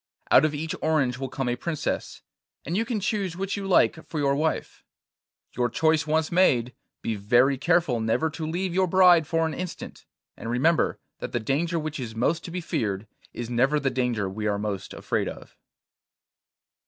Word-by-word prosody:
Out 140 - +7
of 150 -1 -1
each 155 +2 -3
orange 140 -6 +1
will 135 -1 -3
come 135 0 -3
a 120 - +1
princess, 155 +4 -3 0.4
and 165 - -2
you 225 +3 +1
can 230 -2 -2
choose 195 -3 -2
which 195 +1 -2
you 200 -1 -4
like 170 -3 +3
for 160 - -6
your 140 -2 +2
wife. 155 +2 -2 0.7
Your 120 0 +1
choice 160 +4 +2
once 160 +1 +1
made, 125 -9 +3 0.3
be 115 - -1
very 120 +7 +3
careful 150 -3 +2
never 115 +8 +1
to 155 0 -5
leave 180 +2 -2
your 185 +1 +2
bride 180 -3 +6
for 165 0 +1
an 160 - -2
instant, 180 0 -7 0.3
and 115 - -7
remember 145 +8 +2 0.2
that - - -6
the 120 - +1
danger 155 +9 0
which 155 -2 -4
is 115 -3 -6
most 160 +8 0
to - - -6
be 180 +1 -4
feared 100 - -2 0.3
is 120 - -5
never 130 +5 +2
the 135 -2 0
danger 125 -5 0
we 105 +3 -3
are 100 -1 +1
most 100 -2 -4
afraid - - -2
of. - - -9
150 Hz, 190 wpm, -26 LUFS, 120-170 Hz, 0.7 s, Out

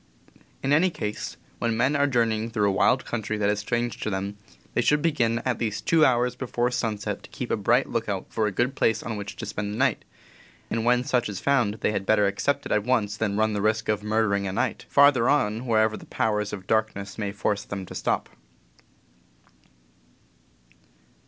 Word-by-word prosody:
In 135 +2 +2
any 170 +5 +4
case, 105 -10 -5 0.2
when 115 -1 0
men 130 +5 +2
are 145 0 +3
journeying 115 -3 +1
through 105 -3 +1
a - - +3
wild 125 +6 +3
country 110 -2 -3
that 105 -1 +2
is 105 - -1
strange 120 +3 -2
to - - -2
them, 100 +1 -3 0.4
they - - +2
should 150 +4 +2
begin 120 -8 +1
at 125 -3 0
least 110 -3 -3
two 165 -2 +4
hours 125 -2 +3
before 125 -1 -1
sunset 110 -4 -2
to - - -14
keep - - -6
a - - +3
bright - - +2
lookout - - -2
for 110 -1 0
a - - -1
good 120 +7 0
place 115 -4 +1
on 115 - -4
which 100 -1 -6
to 115 - -6
spend 105 -1 -4
the 105 - -5
night, 135 -2 +1 0.7
and 115 0 -1
when 125 +1 +3
such 125 -3 0
is 100 -2 -5
found 120 -6 +2
they - - +2
had 100 -2 -3
better 105 -1 +4
accept 140 +8 0
it - - -5
at 105 - +2
once 110 -4 +1
than 105 -2 -1
run 110 0 +2
the 105 - -1
risk 110 +1 0
of 105 -1 +1
"murdering 105 -2 +1
a - - -2
night" 95 - -2
farther 140 -4 +5
on, 115 -4 +1
wherever 110 -1 +3
the - - -11
powers 105 -2 -1
of 95 -2 -7
darkness 110 -1 -1
may 100 -2 -2
force 100 0 -1
them 100 -1 -6
to - - -10
stop. - - -1
110 Hz, 205 wpm, -25 LUFS, 105-125 Hz, 0.7 s, farther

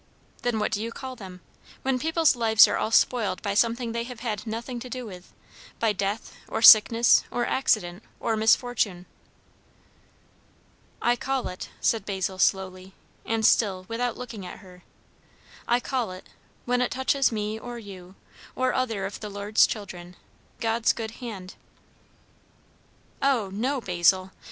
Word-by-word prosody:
"Then 245 -2 0
what 210 - -1
do 205 - -1
you 230 +1 -4
call 260 +1 -7
them? 185 -5 -11 0.4
When 265 -1 0
people's 320 0 +2
lives 225 -2 +6
are - - -1
all - - -1
spoiled 230 -1 +2
by 200 -2 -1
something 230 +2 +1
they 235 0 -2
have 245 -2 -9
had 225 -2 -4
nothing 235 +3 -5
to 250 +1 -8
do 250 0 -5
with 185 -4 -11 0.5
by 225 -2 +2
death, 200 +2 -3
or 220 - -3
sickness, 230 +2 +8
or 240 - -1
accident, 205 -8 0 0.2
or 225 - 0
misfortune." 220 -4 +1 2.0
"I 240 - +3
call 265 +1 -2
it," 180 - -8
said 225 - +1
Basil 190 -1 -3
slowly, 190 -1 0 0.3
and 225 -1 0
still 190 -5 +3
without 240 +1 -2
looking 235 -5 -7
at 180 - -8
her, 180 -2 -15 0.9
"I 240 +1 +3
call 250 -3 -2
it, 185 0 -10 0.4
when 245 0 +1
it 250 - +1
touches 265 +1 +1
me 215 0 -3
or 240 +1 -7
you, 190 -4 -11 0.4
or 255 0 +1
other 225 -7 -1
of 195 - -6
the 210 - -6
Lord's 205 +2 +3
children, 180 -4 -7 0.4
God's 225 0 +1
good 220 -1 -5
hand." 195 -6 -7 1.7
"O 245 -8 +1
no, 260 +7 -1
Basil! 185 -1 +2
220 Hz, 150 wpm, -26 LUFS, 195-245 Hz, 2.0 s, sickness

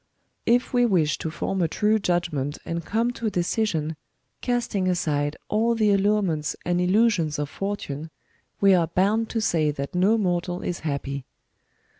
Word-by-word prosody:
If 245 +2 +2
we 245 0 +4
wish 175 -10 +2
to 160 - -3
form 190 +4 -2
a 170 - +3
true 210 +6 +2
judgment 170 -7 -1
and 170 0 -3
come 230 +7 0
to 235 -2 -4
a - - +2
decision, 175 -4 -1 0.5
casting 235 -6 0
aside 150 -5 0
all 230 +2 +2
the 215 -2 +3
allurements 195 -6 +1
and 175 0 +1
illusions 185 -5 +2
of 145 -1 -3
fortune, 165 -7 -4 0.5
we 195 -1 +6
are 170 -3 +3
bound 205 +6 +1
to 230 - -1
say 165 -8 +2
that 140 -1 -4
no 190 +5 +3
mortal 180 -3 -1
is 175 - -3
happy. 140 -3 -4
180 Hz, 160 wpm, -25 LUFS, 155-215 Hz, 0.5 s, we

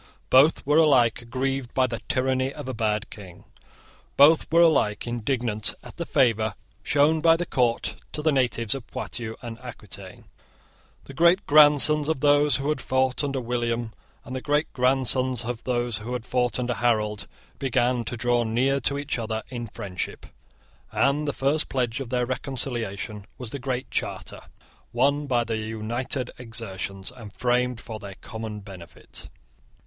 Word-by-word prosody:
Both 140 +5 +5
were 150 +3 +4
alike 130 -8 +4
aggrieved 130 +2 -3
by 130 - +4
the 115 -2 -4
tyranny 130 0 +1
of 130 - -8
a 130 - -3
bad 110 -1 -1
king. 95 -5 -11 0.7
Both 150 +3 +6
were 170 +1 +6
alike 140 -10 +2
indignant 120 -2 -1
at - - -12
the 170 - -4
favour 110 -6 +2 0.3
shown 150 +2 +3
by 165 0 +5
the 175 - -2
court 120 -6 0 0.2
to 150 - -4
the 155 - +3
natives 120 -5 +1
of 135 -4 -7
Poitou 115 -2 -5
and 115 -1 -7
Aquitaine. 100 -6 -10 0.8
The 140 - -11
great 170 +6 +4
grandsons 150 0 +5
of 160 - 0
those 145 -1 +4
who 140 +2 -1
had 150 -4 -1
fought 130 +1 +1
under 135 -2 -1
William 120 -1 -2 0.3
and 130 - -6
the 130 - -3
great 145 +2 0
grandsons 130 -1 +2
of 120 -1 -5
those 120 -2 -1
who 115 +4 -5
had 120 -2 -4
fought 125 -1 +1
under 125 -1 -1
Harold 105 -2 0 0.3
began 125 -2 +1
to 120 - -4
draw 120 +1 +2
near 125 +5 +1
to 140 +2 0
each 140 -3 -2
other 110 -1 -3
in 120 -2 -5
friendship; 95 -3 -5 0.7
and 145 +2 +1
the - - +1
first 140 +3 0
pledge 125 -1 -1
of 135 -4 -5
their 125 0 0
reconciliation 120 -6 -4
was 125 -3 -6
the 140 - -5
Great 130 -1 -3
Charter, - - -3 0.5
won 140 +4 +2
by 120 -3 +2
their 115 -1 -2
united 110 +4 -3
exertions, 100 -4 -5
and 115 -5 -11
framed 125 +1 0
for 110 -2 -7
their 100 -1 -9
common 110 -1 -7
benefit. 95 -3 -11
125 Hz, 165 wpm, -25 LUFS, 115-135 Hz, 0.8 s, Both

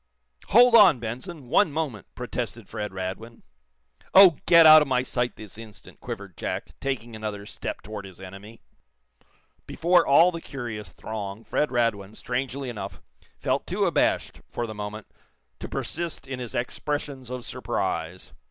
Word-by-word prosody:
"Hold 245 +3 +6
on, 210 - +8
Benson! 130 +7 -7
One 165 +5 +3
moment 140 -9 -4
" - - -48
protested 115 -3 -5
Fred 105 0 -5
Radwin. 95 +5 -6 0.7
"Oh, 190 -5 +9
get 170 -1 +8
out 155 0 +10
of 150 - 0
my 130 -1 +1
sight, 125 -1 -2
this 110 0 -11
instant," 110 -3 -13
quivered 100 -3 -7
Jack, - - -4
taking 120 -4 -4
another 105 -2 -5
step - - -6
toward 105 -2 -7
his 95 -2 -13
enemy. 100 +4 -11 1.1
Before 175 +1 +3
all 165 +6 +6
the 165 -1 -6
curious 115 - -6
throng 105 0 -6
Fred 150 - 0
Radwin, 110 -4 -1
strangely 130 +2 -3
enough, 100 - -6 0.4
felt - - -1
too - - 0
abashed, - - 0
for 120 - -4
the 110 - -6
moment, 105 0 -6 0.5
to - - -7
persist 170 0 -4
in 130 -1 -5
his 120 -4 -6
expressions 135 +1 -3
of 125 -1 -6
surprise. 85 +3 -3
120 Hz, 150 wpm, -25 LUFS, 105-140 Hz, 1.1 s, out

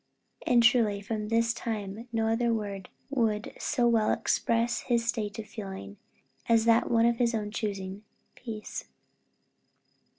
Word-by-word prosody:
And 240 -1 +5
truly, 225 -3 +4
from 210 +1 -4
this 230 +1 +2
time 220 -1 -5
no 225 -1 0
other 230 +1 +2
word 200 -4 -3 0.2
would 225 -5 0
so 245 -5 +1
well 225 -2 +3
express 230 +1 +1
his 235 -1 0
state 220 -3 -2
of 220 - -5
feeling, 190 - -8 0.5
as 230 -1 +4
that 230 0 +4
one 230 -1 +4
of 235 0 +3
his 235 -1 +2
own 210 -1 -3
choosing 200 -3 -4 0.3
peace. 220 -4 -7
225 Hz, 140 wpm, -29 LUFS, 210-235 Hz, 0.5 s, And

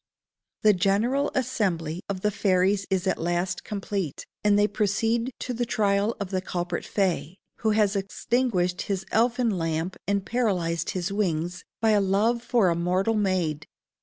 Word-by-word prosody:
The 215 -1 +7
general 215 +9 +1
assembly 185 - -1
of 190 -2 -3
the 210 - +1
fairies 195 0 +2
is 190 -2 0
at 190 - 0
last 175 +2 -1
complete, 195 -6 -4 0.2
and 205 -1 +4
they 205 0 +4
proceed 225 +4 0
to 250 - -3
the 240 +1 -1
trial 205 -1 +1
of 200 -2 -4
the 185 -1 0
culprit 175 -2 -3
fay, 185 -3 -1 0.2
who 220 - 0
has 210 -1 +3
extinguished 195 -2 0
his 190 -2 -3
elfin 235 +1 +2
lamp 165 +2 -2
and 200 -1 0
paralyzed 180 -9 0
his 180 +2 -2
wings 175 -3 -1 0.2
by 225 -1 +4
a 210 -1 +4
love 210 +5 +2
for 235 -5 +2
a 170 - +1
mortal 180 +5 +1
maid. 185 -8 0
195 Hz, 160 wpm, -26 LUFS, 180-220 Hz, 0.2 s, The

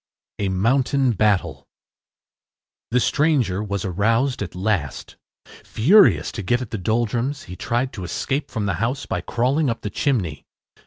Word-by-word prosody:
A 100 -2 0
MOUNTAIN 125 +7 +2
BATTLE 90 -9 0 1.2
The 125 - +2
stranger 130 - +1
was 100 -2 -3
aroused 115 +8 +1
at 95 -4 -5
last. 90 -8 -2 0.5
Furious 120 - +4
to - - -5
get 120 +6 +1
at 125 -4 -7
the 110 - -3
Doldrums, 120 +7 -1
he 90 - -9
tried 120 +5 -2
to 100 -6 -6
escape 135 - -2
from 110 -4 -3
the 100 - 0
house 125 +4 -1
by - - -3
crawling 130 +5 0
up 115 - -3
the 105 - -4
chimney. 100 - -1
115 Hz, 150 wpm, -22 LUFS, 95-130 Hz, 1.2 s, Furious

